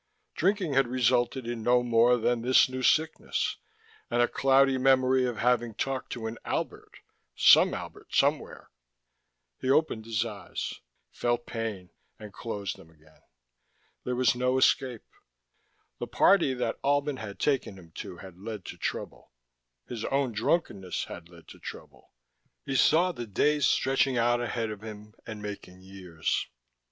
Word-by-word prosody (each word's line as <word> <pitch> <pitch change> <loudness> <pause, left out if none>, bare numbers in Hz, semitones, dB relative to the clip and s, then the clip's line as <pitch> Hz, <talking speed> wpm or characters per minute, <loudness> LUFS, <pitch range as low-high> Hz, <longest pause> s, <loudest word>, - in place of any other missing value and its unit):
Drinking 185 -3 0
had 135 -1 +3
resulted 125 0 +1
in 120 -1 -4
no 125 +2 +3
more 120 +1 +4
than 120 0 0
this 125 +2 +5
new 130 0 -5
sickness, 160 +5 +1 0.5
and 120 - 0
a 120 - +4
cloudy 135 0 +3
memory 130 0 +3
of 120 -3 -4
having 120 -1 +1
talked 135 +3 -3
to 115 -2 -6
an 110 +1 -5
Albert, - - -5 0.3
some - - +6
Albert, - - -9
somewhere.... - - 0 0.9
He 130 - -3
opened 135 -6 +2
his 115 0 0
eyes, 105 -3 -6 0.3
felt 120 0 -1
pain 110 -6 -5 0.3
and 105 -2 -11
closed 105 -4 -5
them 80 - -16
again. 80 -1 -24 0.8
There 125 - -2
was 130 0 +3
no 125 +1 0
escape: 130 -2 +2 1.0
the - - -4
party 165 -10 +3 0.3
Albin 145 0 +1
had 100 -4 -7
taken 135 -9 0
him 85 -3 -15
to 90 - -7
had 95 0 -12
led 105 -2 -7
to - - -9
trouble, - - -5 0.6
his 115 -3 -6
own 135 -2 0
drunkenness 105 - -1
had 85 -1 -9
led 85 -2 -16
to - - -13
trouble. - - -11 0.5
He 135 - -3
saw 170 +7 +4
the 120 -8 -7
days 145 +7 +2
stretching 135 -1 +2
out 120 +1 +2
ahead 115 -2 -2
of 105 -1 -8
him 105 -1 -10
and 110 -2 -7
making 100 -3 -8
years. 90 -4 -3
120 Hz, 150 wpm, -28 LUFS, 105-130 Hz, 1.0 s, some